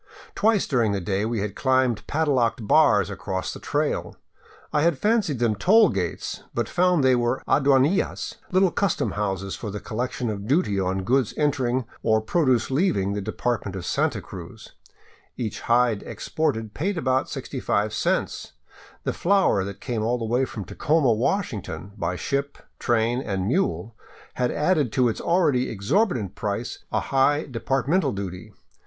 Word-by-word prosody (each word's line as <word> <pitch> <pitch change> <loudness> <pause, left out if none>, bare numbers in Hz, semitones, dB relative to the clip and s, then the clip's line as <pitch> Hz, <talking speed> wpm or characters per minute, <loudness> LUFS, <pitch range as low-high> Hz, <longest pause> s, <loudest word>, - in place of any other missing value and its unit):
Twice 215 -2 +2
during 115 -6 +1
the 100 - -1
day 95 +3 -1
we 115 -2 -1
had 100 -1 -4
climbed 130 -5 +1
padlocked 130 -8 +1
bars - - +4
across 95 -1 -4
the - - -9
trail. - - -2 0.6
I 150 - +3
had 165 -2 +2
fancied 205 - +1
them 115 -2 +2
toll 210 - +5
gates, 90 -4 -3
but 120 -3 0
found 180 -4 +2
they 130 -1 +5
were 120 +1 0
aduanillas, 140 +5 +2
little 185 -1 +4
custom 200 -1 0
houses 100 -2 -2
for 110 - -6
the 105 +1 -5
collection 120 +1 -3
of 100 0 -6
duty 130 - +2
on 95 0 -1
goods 125 +2 +1
entering, 130 -4 +1 0.2
or 110 -1 +3
produce 130 -1 +1
leaving 130 - +1
the 100 - -2
department 110 -1 -2
of 90 -2 -5
Santa - - 0
Cruz, - - -10 0.6
Each 115 -4 -4
hide 120 -3 +2
exported 110 -9 -2
paid 190 +5 -2
about 130 -4 0
65 105 +1 -2
cents; - - -1 0.5
the - - -1
flour 190 - +2
that 100 0 -5
had - - -32
come 110 - -1
all 120 +3 +1
the 115 - -4
way 120 +4 +1
from 105 -6 -7
Tacoma, 145 - +2
Washington, 110 - -2
by 90 -3 -2
ship, 140 +7 -2 0.2
train, 120 +1 +1
and 95 -6 -2
mule 110 - -1 0.4
had 125 -1 0
added 150 -5 +1
to 125 -2 +3
its 110 - -4
already 160 -8 +2
exorbitant 110 - 0
price 105 +3 -4
a - - +1
high 140 +3 +2
departmental 135 +7 0
duty. 100 +1 -6
120 Hz, 160 wpm, -24 LUFS, 105-145 Hz, 0.6 s, toll